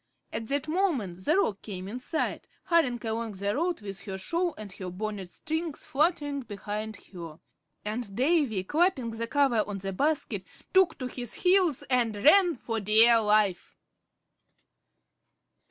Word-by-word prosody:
At 225 0 -3
that 280 +3 -1
moment 280 - -1
the 315 +5 +3
Roc 210 - +1
came 190 -3 -7
in 235 +5 -5
sight, 315 +5 -2 0.2
hurrying 320 -9 +2
along 225 0 -2
the 200 +2 -2
road 340 -1 -1
with 195 -1 -7
her 190 -2 -5
shawl 335 - -1
and 210 -2 -8
her 185 -2 -6
bonnet 200 0 -5
strings 320 -1 -4
fluttering 290 -1 0
behind 215 -1 -5 0.2
her; 165 -3 -8 0.5
and 210 -1 -4
Davy, 260 - +2
clapping 295 - +1
the 230 +1 -4
cover 265 -5 +3
on 205 -1 -4
the 195 0 -4
basket, 295 +9 -1 0.3
took 375 -4 +4
to 255 - -5
his 245 -2 -5
heels 360 -6 +3
and 240 -4 +1
ran 340 - +5
for 230 -2 -3
dear 225 +3 +6
life. 210 -3 +1
230 Hz, 150 wpm, -28 LUFS, 205-310 Hz, 0.5 s, dear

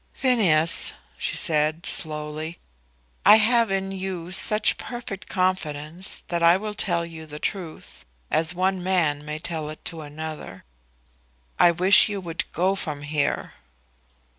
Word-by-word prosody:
"Phineas," 185 - +2 0.2
she - - -3
said, 155 -2 +1
slowly, 155 +1 0 0.7
"I 210 - +9
have 230 +1 +4
in 195 0 -2
you 185 -2 -5
such 210 +3 +2
perfect 240 -5 -7
confidence 180 -2 -1
that 170 -1 -1
I 170 +2 +6
will 210 +1 -5
tell 175 -5 0
you 160 -1 -10
the 150 0 -8
truth; 175 -1 -6 0.3
as 160 +2 +3
one 185 +1 0
man 170 -6 +1
may 150 0 -5
tell 155 -1 -4
it 155 - -10
to 165 -2 -6
another. 150 -9 -8 1.0
I - - +7
wish 185 +6 +5
you 205 -1 -3
would 170 -3 -5
go 185 +3 +1
from 150 -7 -5
here." 145 0 -1
170 Hz, 140 wpm, -24 LUFS, 155-190 Hz, 1.0 s, I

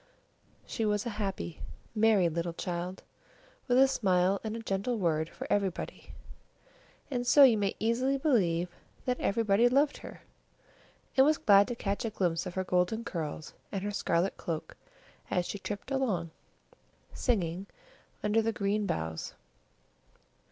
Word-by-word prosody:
She 225 - -3
was 210 0 +1
a 235 - -2
happy, 85 - -4 0.3
merry 215 -4 +4
little 170 +1 -3
child, 180 +2 -4 0.6
with 245 -1 +3
a 270 +1 +7
smile 190 -6 +2
and 220 0 -3
a - - -4
gentle 200 +4 -1
word 160 -4 0
for - - -8
everybody, 195 -3 -2 1.0
and 245 -2 -2
so 285 - +8
you 250 -4 +7
may 200 -2 0
easily 250 +5 +1
believe 185 - +2 0.4
that 250 -1 0
everybody 220 +2 +3
loved 280 +3 +2
her, - - -11 0.9
and 265 - +7
was 305 +2 +4
glad 200 -1 +5
to 240 - -3
catch 200 -3 -2
a 225 - -1
glimpse 175 -4 -1
of 180 - -7
her 190 - 0
golden 180 +5 +1
curls 160 -7 -5 0.2
and 195 -2 -3
her 205 - -2
scarlet 185 -2 0
cloak 160 -2 -5 0.5
as 180 - 0
she 205 - -5
tripped 205 +6 -6
along, 205 -12 0 0.8
singing, 190 -5 -1 0.6
under 210 +2 +3
the 225 +1 0
green 205 0 -1
boughs. 80 0 -3
200 Hz, 145 wpm, -30 LUFS, 180-230 Hz, 1.0 s, so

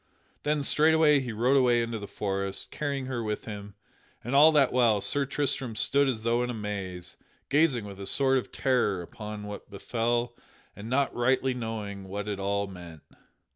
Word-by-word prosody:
Then 150 -1 0
straightway 155 0 +4
he 125 -3 -4
rode 120 +5 +2
away 120 -3 +4
into 115 -1 -4
the 100 - -7
forest, 100 -1 -3
carrying 140 -3 -3
her 130 -2 -3
with 105 -1 -3
him; 100 -2 -8 0.5
and 120 - -4
all 150 +3 +8
that 140 -4 +4
while 120 -4 +4
Sir 140 +6 +1
Tristram 135 -4 -2
stood 140 +6 +3
as 110 -4 -3
though 115 +1 +1
in 125 - -1
a 120 - -3
maze, 95 -4 -6 0.3
gazing 140 -7 +2
with 100 -1 -9
a 100 - -5
sort 135 -1 +3
of - - -9
terror 115 -9 +1
upon 105 +3 -8
what 105 0 -8
befell 120 +3 -2 0.4
and 105 +3 -8
not 140 +2 +1
rightly 130 +2 +1
knowing 110 -5 -5
what 100 +2 -5
it 100 -2 -3
all 100 +1 0
meant. 85 -5 -11
115 Hz, 180 wpm, -28 LUFS, 100-130 Hz, 0.5 s, all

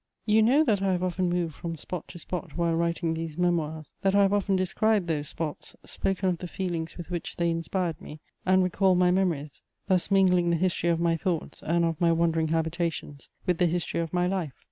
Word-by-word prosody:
You 215 0 +4
know 260 +8 +5
that 210 -9 +1
I 195 -1 +2
have 180 0 -1
often 185 0 0
moved 175 -2 -1
from 165 +3 -5
spot 165 +2 -6
to 175 - -10
spot 175 -1 -6
while 170 -1 +1
writing 170 0 0
these 165 -1 -5
Memoirs; 160 -4 -1
that 195 0 +2
I 200 - +6
have 195 0 +2
often 200 -1 +1
described 195 +2 +1
those 150 -3 -2
spots, 160 -3 -5
spoken 195 0 -1
of 175 -2 0
the 180 - -5
feelings 170 -3 -4
with 175 0 -8
which 175 -2 -4
they 170 -1 +1
inspired 165 +1 -2
me, 155 -4 -10 0.2
and 185 0 +4
recalled 185 0 +2
my 180 0 +4
memories, 170 -6 -1 0.2
thus 185 -1 +1
mingling 180 -3 +4
the 170 - +3
history 175 0 0
of 165 -1 +2
my 170 -1 +2
thoughts 165 0 -3
and 170 +1 +1
of 165 -1 -2
my 170 -1 +4
wandering 165 -1 +2
habitations 160 -2 -2 0.2
with 180 -3 +1
the 180 - +4
history 170 0 -1
of 165 -1 -2
my 180 0 +1
life. 180 -6 -2
175 Hz, 215 wpm, -27 LUFS, 165-185 Hz, 0.2 s, I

